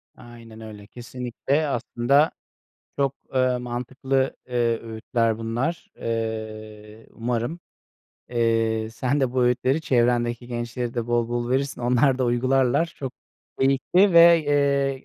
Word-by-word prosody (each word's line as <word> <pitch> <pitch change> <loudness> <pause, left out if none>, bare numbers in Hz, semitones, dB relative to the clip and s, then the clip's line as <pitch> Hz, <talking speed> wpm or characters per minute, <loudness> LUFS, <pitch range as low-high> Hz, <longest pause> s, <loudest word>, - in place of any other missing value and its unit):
Aynen 115 -2 -13
öyle. 105 -2 -10
Kesinlikle 125 +5 -3
aslında 135 +3 +1 0.7
çok, 140 -1 0 0.2
ııı, 130 -1 +2
mantıklı, 130 +2 -2
eee, 120 -2 0
öğütler 115 0 -1
bunlar. 120 +9 -3
Eee, 110 -1 -5
umarım, 120 +7 -3 0.7
eee, 115 -2 0
sen 130 +5 -1
de 130 -2 0
bu 130 - +1
öğütleri 125 +4 +1
çevrendeki 120 -3 +1
gençlere 120 0 -4
de 120 -1 -2
bol 120 -1 0
bol 120 0 -2
verirsin. 135 0 -1
Onlar 125 +2 +2
da 130 - +1
uygularlar. 130 +5 +2
Çok 135 -2 -5 0.5
keyifli 140 +9 +3
ve, 170 0 +8
eee, 140 -2 +1
120 Hz, 120 wpm, -24 LUFS, 115-135 Hz, 0.7 s, ve